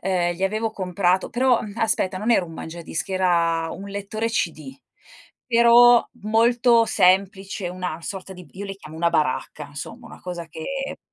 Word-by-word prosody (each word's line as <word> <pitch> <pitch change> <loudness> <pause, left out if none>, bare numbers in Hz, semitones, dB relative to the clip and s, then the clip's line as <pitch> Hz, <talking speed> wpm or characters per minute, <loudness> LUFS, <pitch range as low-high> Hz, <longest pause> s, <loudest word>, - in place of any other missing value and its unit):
ehm, 175 -2 0
gli 185 - -8
avevo 215 +3 0
comprato 185 -2 0
però, 250 0 +3
uhm, 205 - -7
aspetta 190 -4 0
non 220 +4 -1
era 200 -6 +4
un 165 - -11
mangiadischi, 170 +3 -6
era 170 -3 +1
un 195 - -8
lettore 205 +3 -3
CD, 155 -10 -3 0.7
però, 235 0 +6 0.2
molto 230 +2 +4
semplice, 195 -1 +1
una 180 -2 -5
sorta 190 +1 -6
di 180 -1 -12
io 200 +2 -7
le 195 - -5
chiamo 160 -4 -12
una 170 +1 +1
baracca, 150 +1 -1
insomma, 225 - -9
una - - -13
cosa 175 -2 -6
che 270 - -5
190 Hz, 160 wpm, -23 LUFS, 170-225 Hz, 0.7 s, però